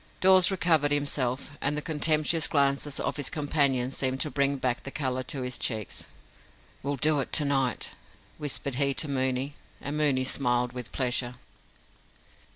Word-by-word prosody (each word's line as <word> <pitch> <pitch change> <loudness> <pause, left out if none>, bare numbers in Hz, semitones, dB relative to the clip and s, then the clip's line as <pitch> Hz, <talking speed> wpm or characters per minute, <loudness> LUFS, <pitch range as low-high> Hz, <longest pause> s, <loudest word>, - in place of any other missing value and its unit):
Dawes 185 -1 +7
recovered 165 -6 +2
himself, 140 -2 -1
and 145 +2 0
the - - -2
contemptuous 155 +1 +1
glances 140 0 +1
of - - -2
his 145 -3 -1
companions 140 -4 +1
seemed 130 0 -1
to 150 - 0
bring 140 0 +1
back 125 -2 -1
the - - -7
colour 130 -2 -2
to 130 +1 -4
his 125 0 -1
cheeks. 110 -4 -3 0.7
"We'll 140 +1 -2
do 150 +3 +2
it 135 - -3
to 150 - +4
night," 135 -3 0 0.5
whispered 140 -2 -2
he 140 -1 +3
to 155 - +2
Mooney, 130 0 0 0.3
and 145 +2 -4
Mooney 145 -4 +2
smiled 125 -2 0
with 125 -2 -7
pleasure. 125 -1 -2
140 Hz, 160 wpm, -28 LUFS, 130-150 Hz, 0.7 s, Dawes